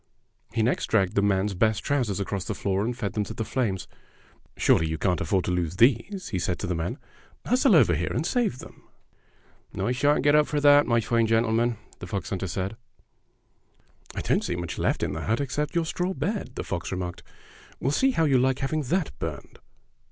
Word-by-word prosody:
He 115 - 0
next 120 - 0
dragged 95 -4 +2
the 100 - +2
man's 100 0 +1
best 110 +3 +1
trousers 125 -9 0
across 100 -1 -3
the - - -3
floor 100 0 -1
and 120 +2 -2
fed 105 -5 -3
them 105 - 0
to - - -7
the 110 - -3
flames. 105 -6 -2 0.7
"Smely, 80 - +3
you 80 0 -2
can't 90 +2 0
afford 95 -4 0
to - - -1
lose 90 -2 -1
those," 130 - +2
he 95 - -2
said 90 0 -1
to - - -4
the 90 - -1
man. 80 +1 -3 0.5
"Hustle 250 -3 +4
over 115 - +5
here 85 +3 -1
and 155 - -1
save 225 - 0
them." - - -12 1.0
"I 100 +5 0
shan't 145 +3 +2
get 145 0 +4
up 150 0 +5
for 150 - -1
that, 145 0 +6
my 120 -1 +3
fine 115 +1 +1
gentle 115 0 +2
man," 115 0 +1 0.2
the - - -7
fox 100 - -4
hunter 95 -1 -2
said. 95 +4 -3 1.4
"I - - -2
don't - - +1
see 90 - -2
much 85 -1 -5
left - - 0
in - - -1
the - - -4
hut 110 +2 0
except 145 +2 -2
your 170 -1 +2
straw 180 +3 -2
bed," 200 - -3
the - - -4
fox 85 -2 -4
remarked. 90 -2 -4 0.6
"We'll 135 - 0
see 265 - +3
how 165 -11 +2
you 135 -4 +4
like 130 +1 +2
having 150 +3 -1
that 160 +5 -1
burned." 75 -5 -6
115 Hz, 210 wpm, -26 LUFS, 95-145 Hz, 1.4 s, that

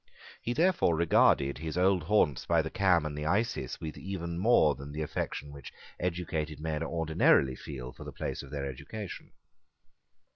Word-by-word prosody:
He 120 - -2
therefore 170 - +3
regarded 70 -4 +3
his 80 +2 -4
old 95 0 +3
haunts 80 - +2
by 85 -1 +3
the 80 - -5
Cam 95 -7 +3
and 75 -1 -4
the 75 +1 -3
Isis 110 +8 -1
with 80 -1 -6
even 85 -3 -4
more 95 -8 +5
than 70 +1 -9
the 75 +1 -3
affection 75 -1 -4
which 70 -3 -10 0.3
educated 80 -4 -2
men 80 0 -2
ordinarily 80 -5 +3
feel 65 -3 -8
for - - -11
the - - -7
place - - -4
of 70 - -11
their 70 -1 -4
education. 95 - -7
80 Hz, 170 wpm, -30 LUFS, 75-90 Hz, 0.3 s, more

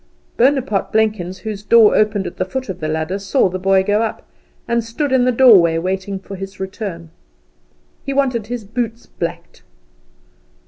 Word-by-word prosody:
Bonaparte 260 -5 +1
Blenkins, 210 -4 0
whose 210 -2 -4
door 220 0 +5
opened 210 -2 +1
at - - -7
the - - 0
foot 255 +6 -5
of 190 - -5
the 155 - -3
ladder, 160 +5 -2
saw 200 +4 +2
the 185 +1 -4
boy 190 0 +3
go 205 +2 +1
up, 225 - -3 0.4
and 235 -1 0
stood 260 +6 -3
in 260 -1 +3
the 255 - +3
doorway 205 -10 +6
waiting 190 +3 -3
for 195 +1 -9
his 195 0 -8
return. 190 -4 -6 0.9
He 275 - -4
wanted 255 -6 0
his 240 -1 -5
boots 230 +2 -4
blacked. 170 0 -6
205 Hz, 170 wpm, -18 LUFS, 190-235 Hz, 0.9 s, doorway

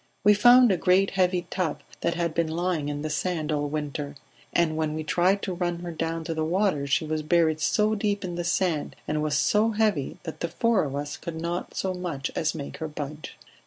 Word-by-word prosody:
We 210 +1 +7
found 245 +3 +7
a 185 - +2
great 190 +2 +3
heavy 180 -2 +1
tub 170 -5 -1 0.2
that 170 - 0
had 170 -2 -1
been 165 0 +1
lying 165 -2 -1
in 145 0 -4
the 155 - -2
sand 155 +1 -1
all 145 -1 0
winter, 145 -1 -4 0.4
and 165 -2 +2
when 155 -1 -1
we 155 - -3
tried 180 +5 +2
to 190 - -2
run 175 -1 -2
her 175 -1 -5
down 165 0 -3
to 165 - -3
the 160 -1 -1
water 170 -4 +1
she 140 +4 +1
was 155 0 -1
buried 160 0 +2
so 210 +6 +2
deep 205 -1 -1
in 175 - -4
the 175 0 -3
sand 170 -3 0
and 150 0 0
was 150 -1 +1
so 210 +8 +3
heavy 210 -10 0
that 160 - -7
the 170 - -1
four 230 +1 +1
of 140 -1 -4
us 145 0 -4
could 160 -1 -6
not 170 +2 -4
so 190 -1 -1
much 170 -7 -4
as 160 0 0
make 145 -3 -6
her 160 - -4
budge. 150 0 -7
170 Hz, 225 wpm, -26 LUFS, 155-185 Hz, 0.4 s, We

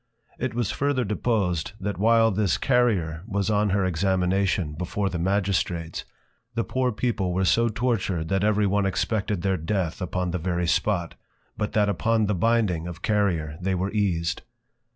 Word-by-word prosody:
It 120 -3 -2
was 120 -4 0
further 140 -2 0
deposed, 100 -6 -1
That 100 -1 -3
while 115 +1 +4
this 100 -2 +1
Carrier 100 -12 +1
was 100 -1 -1
on 105 0 +2
her 95 0 +1
Examination, 95 -1 +1
before 95 +5 -2
the 85 - -4
Magistrates, 90 -3 -1 0.5
the 115 - +1
Poor 130 +1 0
People 105 -6 -1
were 95 +1 +1
so 115 +5 +3
tortured 105 -8 -1
that 95 0 +1
every 105 0 +3
one 100 0 +2
expected 100 0 -1
their 95 -1 +1
Death 85 +2 -2
upon 90 0 -2
the 90 - -2
very 90 +1 -1
spot, 85 0 0 0.4
but 105 -1 -3
that 105 -1 +3
upon 110 +2 +1
the 105 - 0
binding 95 -4 +1
of 85 0 -8
Carrier 85 -8 0
they 95 +1 0
were 95 +2 -1
eased. 90 -6 0
100 Hz, 165 wpm, -25 LUFS, 90-110 Hz, 0.5 s, while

